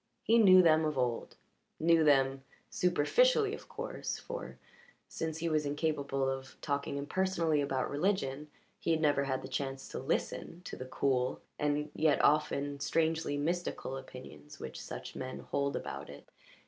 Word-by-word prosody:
He 230 +1 +5
knew 185 -4 +8
them 160 -1 +5
of 155 -3 -1
old 125 -2 -1 0.4
knew 165 0 +4
them 135 -2 +3 0.3
superficially, 415 - +3
of - - -9
course, - - -4
for, - - -7 0.5
since 160 -1 -4
he 170 +1 -2
was 155 -2 +1
incapable 145 -2 -1
of 135 0 -4
talking 140 -1 -2
impersonally 165 0 +1
about 135 -2 -1
religion, 150 -3 -1 0.3
he - - -3
had 160 -1 +3
never 145 -3 +2
had 130 -1 -2
the - - -5
chance 135 -1 -3
to - - -5
listen 175 +2 -3
to - - -6
the 130 - -7
cool 130 -1 0 0.2
and 150 0 0
yet 155 -3 +3
often 145 -1 +2
strangely 160 -1 0
mystical 165 -3 -2
opinions 125 - -10
which - - -7
such - - -7
men 130 0 -5
hold 140 0 -1
about - - -5
it. 70 - -11
145 Hz, 155 wpm, -32 LUFS, 135-165 Hz, 0.5 s, knew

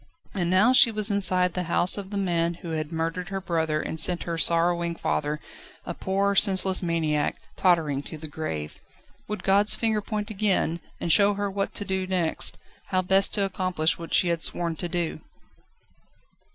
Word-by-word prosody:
And 175 -4 -1
now 200 +8 +4
she 250 - +7
was 215 -1 0
inside 185 -3 +3
the 180 -1 -3
house 175 +1 +4
of 200 -2 -6
the 205 - -4
man 170 -3 0
who 170 - -9
had 155 0 -4
murdered 165 +2 -3
her 195 0 -3
brother 160 -4 -1
and 160 - -5
sent 175 +2 +3
her 170 - -4
sorrowing 170 +1 +1
father, 150 -2 -2 0.5
a 175 - -4
poor, 195 +3 -1
senseless 190 -2 +3
maniac, 160 -4 -1 0.2
tottering 160 -7 +1
to 160 - -8
the 155 +1 -9
grave. 80 - -6 0.5
Would 210 0 -5
God's 200 +2 +4
finger 220 -2 0
point 210 +1 -4
again, 195 -5 0 0.2
and 170 - -1
show 205 +4 +4
her 200 0 -3
what 195 0 -3
to 205 - -2
do 190 -1 -2
next, 180 -4 +1 0.3
how 185 -1 -1
best 195 +2 +3
to 205 - +1
accomplish 185 -5 -1
what 165 - -8
she 180 - +3
had 170 -1 -1
sworn 170 -1 0
to 175 - -5
do? 170 -2 -3
180 Hz, 180 wpm, -25 LUFS, 165-195 Hz, 0.5 s, she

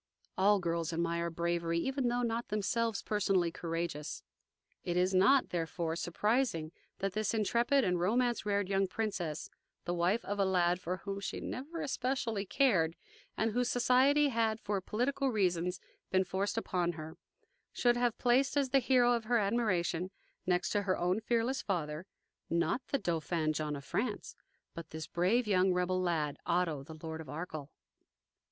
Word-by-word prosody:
All 205 +2 +4
girls 170 -2 -1
admire 170 0 -1
bravery, 170 0 -1
even 265 +7 0
though 245 +1 0
not 235 0 -1
themselves 215 +1 -1
personally 195 -5 +1
courageous. 165 -3 -4 0.6
It 175 0 -1
is 185 +1 +2
not, 205 +9 +5
therefore, 165 -1 -2
surprising 175 -1 0 0.3
that 195 -1 -2
this 215 +2 0
intrepid 235 +5 +2
and 180 -3 +1
romance 240 +6 +1
reared 200 -2 0
young 195 0 +1
princess, 185 -7 -3 0.3
the 175 - -1
wife 175 +6 +1
of 205 0 -3
a - - +4
lad 180 -2 +2
for 180 +1 -2
whom 195 +2 -5
she 195 - -4
never 310 +6 -5
especially 250 -6 -1
cared, 185 - +3 0.4
and 225 +1 +1
whose 245 +2 +1
society 265 +4 +4
had 225 -3 +1
for 205 -3 -2
political 265 +7 0
reasons 180 -5 0 0.3
been 190 0 +3
forced 190 +4 -2
upon 180 -5 0
her, 155 0 -8 0.6
should 240 -1 +2
have 240 -1 +1
placed 260 +3 +2
as 275 -2 +2
the 275 - +5
hero 245 -1 +4
of 230 -2 -1
her 240 +2 +3
admiration, 195 -5 0 0.4
next 180 -1 +1
to 205 - +2
her 190 -2 0
own 180 +4 +1
fearless 235 +3 0
father, 165 -2 -3 0.4
not 170 +8 +1
the 275 - +1
Dauphin 165 - -1
John 150 -1 -2
of 140 -1 -8
France, 215 -1 -3 0.4
but 165 -2 -8
this 160 -1 -6
brave 195 +11 +1
young 190 -2 +3
rebel 180 +1 +1
lad, 160 -5 0
Otto, 170 -5 0
the 155 +3 -10
Lord 160 0 -5
of 155 - -11
Arkell. 155 -1 -6
190 Hz, 160 wpm, -33 LUFS, 170-235 Hz, 0.6 s, not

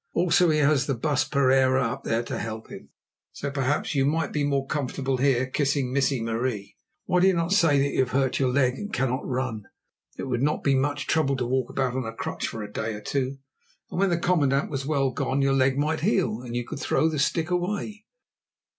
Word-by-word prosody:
Also 175 0 +3
he 155 - +2
has 145 -2 +3
the 135 - 0
Baas 145 +3 +1
Pereira 130 -2 +3
up 125 +4 -3
there 115 +1 0
to - - -4
help 110 0 -6
him. - - -10 0.4
So 140 - -4
perhaps 140 +2 -1
you 135 -2 +2
might 155 +2 0
be 150 - 0
more 140 -1 0
comfortable 135 -2 -2
here 130 -1 +2
kissing 135 -1 -1
Missie 135 -3 +1
Marie. 115 -2 -3 0.3
Why 180 - +2
do 185 - +5
you 190 - +3
not 170 +1 -1
say 165 -8 +4
that 140 +1 +1
you - - -1
have 130 -2 +2
hurt 135 0 0
your 130 -2 +2
leg 130 -1 +1
and 205 - -6
cannot 130 +1 -1
run? 125 -5 -3 0.5
It - - -5
would 125 -3 -2
not 150 +2 0
be 140 - +3
much 145 +2 0
trouble 150 -4 +1
to 125 -2 -2
walk 130 0 0
about 130 -2 -1
on 130 -1 -2
a 115 - -5
crutch - - -4
for 110 - -5
a 105 0 -9
day 110 0 -3
or 105 - -8
two, 135 +3 -2 0.5
and - - -3
when 195 0 +3
the 170 - +1
commandant 145 -6 +1
was 135 -1 -3
well 140 -3 +1
gone, 135 +2 -1
your 135 0 +2
leg 135 0 +2
might 155 +2 0
heal 170 - 0
and 120 -1 -7
you 120 -1 -2
could 140 - -7
throw 155 - +1
the 155 -2 -2
stick 160 +4 0
away." 205 +4 -2
135 Hz, 225 wpm, -25 LUFS, 130-150 Hz, 0.5 s, do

